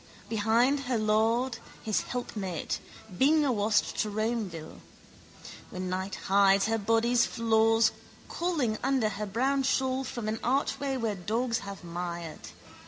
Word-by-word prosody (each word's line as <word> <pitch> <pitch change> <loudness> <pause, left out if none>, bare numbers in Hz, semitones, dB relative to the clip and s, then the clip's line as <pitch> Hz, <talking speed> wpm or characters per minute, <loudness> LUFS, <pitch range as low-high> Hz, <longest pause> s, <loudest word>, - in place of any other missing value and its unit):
Behind 230 +6 +2
her 250 - +2
lord, 225 +3 +1 0.2
his 215 -2 +1
helpmate, 205 -8 -4 0.4
bing 295 - +4
awast 215 -5 +1
to 215 - 0
Romeville. 210 -7 -3 0.9
When 185 0 -4
night 190 +1 -3
hides 195 0 +4
her 225 +1 0
body's 230 +3 +3
flaws 225 0 +3 0.4
calling 295 -11 -1
under 260 -4 +2
her 210 0 -4
brown 265 +7 +1
shawl 265 0 +1
from 235 -4 -5
an 220 +1 -2
archway 270 +2 0
where 225 -4 -1
dogs 225 +6 -1
have 200 -2 -8
mired. 170 -1 -5
225 Hz, 125 wpm, -29 LUFS, 200-250 Hz, 0.9 s, bing